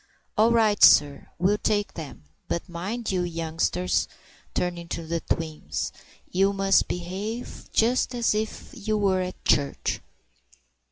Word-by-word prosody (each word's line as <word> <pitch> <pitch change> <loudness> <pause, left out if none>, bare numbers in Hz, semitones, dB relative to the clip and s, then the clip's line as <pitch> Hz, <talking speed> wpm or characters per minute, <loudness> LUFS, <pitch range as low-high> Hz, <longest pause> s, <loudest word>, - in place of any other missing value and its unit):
"All 220 +2 +4
right, 220 -3 +3
sir! 145 -1 +6
We'll 195 +4 +2
take 205 -1 0
them.—But 135 - -7
mind 195 +7 -4
you, 185 -1 +1
youngsters"—turning 165 - -2
to 170 0 -4
the 165 +1 -1
twins—"you 165 +4 -2
must 195 -1 +3
behave 195 +7 -5
just 245 +2 +2
as 235 -3 +2
if 215 +1 -3
you 215 -4 -1
were 195 -2 +2
at 185 0 -6
church." 140 -1 +1
185 Hz, 115 wpm, -26 LUFS, 165-215 Hz, -, sir